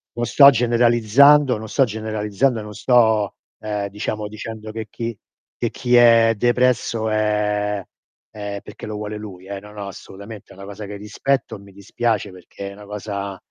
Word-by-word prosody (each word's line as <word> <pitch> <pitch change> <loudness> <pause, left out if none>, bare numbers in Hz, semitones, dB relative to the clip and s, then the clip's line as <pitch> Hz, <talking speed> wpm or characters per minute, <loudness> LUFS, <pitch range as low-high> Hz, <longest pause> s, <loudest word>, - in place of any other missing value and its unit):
non 120 0 -1
sto 140 +4 +8
generalizzando, 120 +2 +4
non 110 0 -8
sto 135 - +3
generalizzando 110 +2 -1
e - - -6
non 105 0 -9
sto, 110 -3 +2 0.2
ehm, 105 -2 -3
diciamo 105 +1 -4
dicendo 110 0 -8
che 110 0 -6
chi 115 -3 -5 0.4
che 120 - -1
chi 125 -2 0
è 115 -1 +6
depresso 120 -1 +1
è 105 -1 0 0.5
è 100 -1 -5
perché - - -10
lo 110 -1 -5
vuole 105 0 -5
lui 95 -3 -10
eh, 100 -1 -5
no, 105 +1 -14
no 100 -1 -7
assolutamente, 100 +2 -11
è - - -13
una 100 +1 -10
cosa 100 +1 -8
che 100 +1 -7
rispetto 115 +7 -2
e - - -16
mi 100 0 -15
dispiace 105 +1 -2
perché 100 +2 -9
è - - -10
una 105 +1 -13
cosa 100 -1 -5
105 Hz, 180 wpm, -21 LUFS, 100-115 Hz, 0.5 s, sto